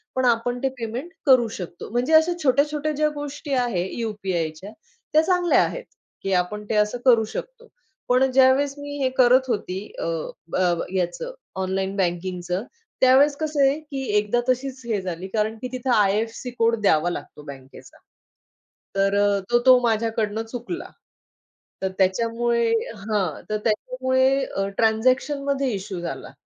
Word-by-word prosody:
पण 260 0 +1
आपण 245 +1 +1
ते 270 - +2
पेमेंट 240 +9 -5
करू 255 -4 +5
शकतो. 175 -2 -8
म्हणजे 245 +7 0
अशा 320 +2 +5
छोट्या-छोट्या 295 +3 +2
ज्या 305 +1 +1
गोष्टी 290 0 -5
आहे 235 -9 0
यू-पी-आयच्या 195 -5 -3 0.4
त्या 310 - +6
चांगल्या 355 0 +3
आहेत - - -4 0.4
की 195 - -1
आपण 185 +4 0
ते - - 0
असं 210 +3 +2
करू 235 -4 +6
शकतो. 485 0 -7 0.4
पण 250 +1 +4
अ, - - +4
ज्यावेळेस 265 +2 +4
मी 285 0 -6
हे 260 - +3
करत 255 +1 +5
होती, 190 -6 -2 0.2
अ, - - -3 0.5
अ, 180 -1 +3 0.2
याचं 185 - -2 0.3
ऑनलाईन 190 +1 -2
बँकिंगचं. 180 0 -2 0.4
त्यावेळेस 270 +3 +5
कसं 305 -1 -1
आहे, 280 +3 0
की 285 -3 -6
एकदा 210 +3 +1
तशीच 260 +1 -1
हे 220 -4 -1
झाली, 180 0 -5
कारण 215 +2 -1
की 255 - -3
तिथे 255 0 -4
आय-एफ-सी 215 +4 +1
कोड 230 0 +4
द्यावा 175 -4 +3
लागतो 150 -3 -7
बँकेचा. 135 -1 -12 1.0
तर 195 0 +2
अ, 200 -1 +2
तो 240 - +5
तो 255 -1 +8
माझ्याकडून 225 -1 0
चुकला. 245 +9 -6 0.9
तर 190 - 0
त्याच्यामुळे 230 +4 +1 0.3
हां, 205 -2 -2
तर 215 - 0
त्याच्यामुळे 260 +4 +1
अ, 195 0 -3
ट्रान्झॅक्शनमध्ये 265 +4 +1
इश्यू 190 -2 -5
झाला 170 - -6
235 Hz, 145 wpm, -23 LUFS, 195-265 Hz, 1.0 s, तो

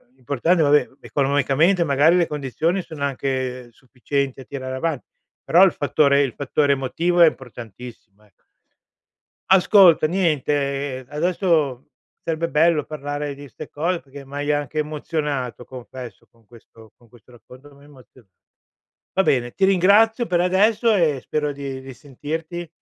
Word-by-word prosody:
l'importante 140 +7 0
vabbè 145 0 +3
economicamente 145 +6 +1
magari 150 +5 +4
le 170 - +2
condizioni 150 +6 -2
sono 155 -4 -8
anche 130 -2 -3
sufficienti 135 +2 -4
a - - -10
tirare 130 -2 -6
avanti, 140 -3 -3 0.4
però 175 +4 +5
il 190 - +5
fattore 140 -1 +2
il 130 - -3
fattore 140 +1 +1
emotivo 170 +7 0
è 165 - +9
importantissimo, 115 -4 -12
ecco. 105 - -33 1.1
Ascolta 185 -4 +6
niente, 145 -6 -1
ehm, 130 - -14
adesso 155 -5 0 0.3
sarebbe 165 0 -2
bello 155 -1 +2
parlare 145 -1 -5
di 145 0 -11
'ste 125 - -11
cose 170 +4 -2
perché 140 0 -13
m'hai 145 +2 -3
anche 145 +1 -2
emozionato 150 -5 -4
confesso 125 -1 -10
con 115 -2 -29
questo 115 -1 -18
con 120 -2 -25
questo 120 0 -21
racconto 125 +4 -16
mi 140 - -20
hai - - -18
emoziona 130 -5 -19 0.9
va 190 - +2
bene 120 -8 0
ti 195 - +1
ringrazio 205 +5 +4
per 175 -3 0
adesso 215 +5 +2
e 155 -8 +1
spero 150 +1 -2
di 140 -1 -6
risentirti, 155 +6 -7
145 Hz, 140 wpm, -21 LUFS, 130-165 Hz, 1.1 s, è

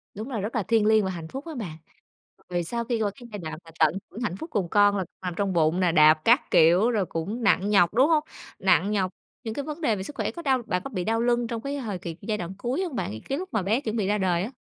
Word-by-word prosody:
Đúng 215 +5 -6
là 235 -6 -3
rất 210 +5 -4
là 220 - +1
thiêng 225 +1 +2
liêng 215 -1 +4
và 190 - -1
hạnh 170 -3 -6
phúc 270 - -7
á 320 - -6
bạn. 180 - -6 0.7
Về 175 -1 -1
sau 235 +7 -3
khi 235 -2 -1
qua 205 -2 +1
cái 240 - -12
giai 205 - -6
đoạn 155 -2 -6
mà 165 - -13
tận 160 +3 +4
hưởng 235 - -8
hạnh 210 -7 -2
phúc 320 - -7
cùng 195 - -1
con 205 +1 +4
là 190 - -1 0.2
nằm 180 -1 -3
trong 200 -2 0
bụng 165 +1 +2
nè, 180 -2 +3
đạp 155 -1 +7
các 240 +5 +4
kiểu 175 +9 +5
rồi 210 -5 +1
cũng 200 +9 -4
nặng 200 -1 +3
nhọc, 195 -4 +4
đúng 255 +6 +5
hông? 310 -2 +3 0.4
Nặng 190 0 +3
nhọc, 190 -3 0 0.3
những 220 -2 -4
cái 285 - -3
vấn 305 +3 -6
đề 230 -9 +2
về 190 - -5
sức 285 - -8
khỏe - - -2
có 340 - -8
đau 265 -5 +1
bạn 180 -4 -1
có - - -5
bị 185 -8 -3
đau 225 +3 0
lưng 240 0 +1
trong 230 -1 -4
cái 280 +3 -3
hời 220 -8 -4
kì 165 -1 -6
giai 210 +1 -2
đoạn 175 -1 -5
cuối 250 - -2
hông 340 -8 -4
bạn, 100 - -2 0.2
cái 275 - 0
lúc 370 +3 -5
mà 215 - +1
bé 215 +8 +1
chuẩn 220 -5 -3
bị 210 -4 0
ra 210 +1 +2
đời 180 -3 +1
á? 220 - -5
210 Hz, 300 wpm, -26 LUFS, 180-240 Hz, 0.7 s, đạp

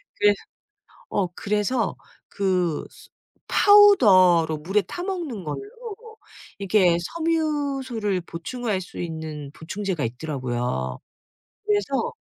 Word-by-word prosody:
그래서 205 0 +4 0.7
어 200 - 0
그래서 210 +3 -1 0.3
그 180 -5 0
스 - - -17 0.4
파우더로 195 - +6
물에 195 +7 +1
타 350 - -7
먹는 335 - -4
걸로 150 - -4 1.0
이게 190 -3 +3 0.2
섬유소를 280 - -1
보충할 195 +5 -4
수 185 - -10
있는 160 -4 -6
보충제가 180 -1 -3
있더라고요. 120 - -3 0.7
그래서 405 - 0
195 Hz, 215 characters per minute, -24 LUFS, 160-260 Hz, 1.0 s, 파우더로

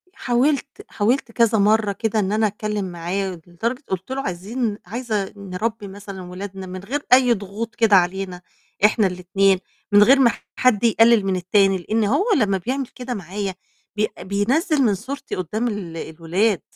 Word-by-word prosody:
حاولت 265 +1 +1 0.2
حاولت 235 +4 0
كذا 230 -1 +3
مَرّة 210 0 +3
كده 220 +2 -1
إن 195 -1 0
أنا 215 +1 +2
أتكلّم 210 0 -3
معاه 180 +1 -3
لدرجة 230 - -3
قُلت 190 +5 -4
له 270 +1 -2
"عايزين 210 +2 -3
عايزة 215 -1 -3
نربّي 200 +3 -4
مثلًا 195 0 -9
ولادنا 190 +1 -7
من 185 0 -7
غير 280 +8 -3
أي 255 -1 +6
ضغوط 210 +2 -6
كده 220 -3 +4
علينا 185 0 +1 0.4
إحنا 210 -1 +4
الاتنين 190 +1 +1 0.3
من 205 0 +7
غير 270 +5 +6
ما 245 -3 +5 0.2
حد 250 -5 +2
يقلِّل 225 -2 +5
من 190 -1 +1
التاني." 195 +2 +3
لإن 215 +5 -1
هو 275 - +2
لمّا 200 -6 +2
بيعمل 255 +7 -3
كده 250 0 -6
معايا 195 -1 -4 0.4
بي 215 0 +1
بينزّل 245 - +1
من 220 -6 +3
صورتي 270 +8 -6
قدّام 210 +7 -2
ال 190 -7 -5
الولاد، 170 +4 -1
205 Hz, 160 wpm, -22 LUFS, 190-235 Hz, 0.4 s, من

